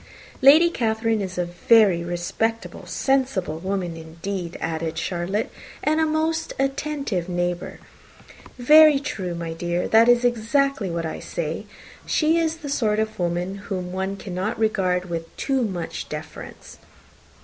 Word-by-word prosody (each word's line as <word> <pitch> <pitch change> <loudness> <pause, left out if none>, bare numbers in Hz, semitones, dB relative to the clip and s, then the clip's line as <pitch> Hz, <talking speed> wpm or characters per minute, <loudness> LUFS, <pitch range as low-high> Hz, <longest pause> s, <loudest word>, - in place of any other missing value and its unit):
"Lady 300 +6 +8
Catherine 225 -4 0
is 185 -2 -5
a 180 - 0
very 175 0 +4
respectable, 175 +6 -3
sensible 255 - 0
woman, 185 -2 -3
indeed," 170 +2 -6
added 160 0 -3
Charlotte, 175 +5 -2 0.3
"and 310 +1 +2
a 320 - +3
most 320 +1 -1
attentive 270 - -2
neighbour." 175 0 -2 0.8
"Very 300 +4 +7
true, 190 -11 -4
my 170 -1 -4
dear, 175 +1 -2
that 225 +2 +5
is 245 0 +4
exactly 245 -1 +1
what 170 -1 -3
I 160 - -4
say. 165 +5 -4 0.4
She 320 +1 +2
is 325 -1 0
the - - -3
sort 220 -7 +1
of 220 -1 -2
woman 175 +2 -1
whom 180 -2 -3
one 190 +1 -3
cannot 190 +3 -3
regard 185 -5 +1
with 165 -2 -6
too 270 -2 0
much 185 -7 -4
deference." - - -9
195 Hz, 140 wpm, -23 LUFS, 175-255 Hz, 0.8 s, Lady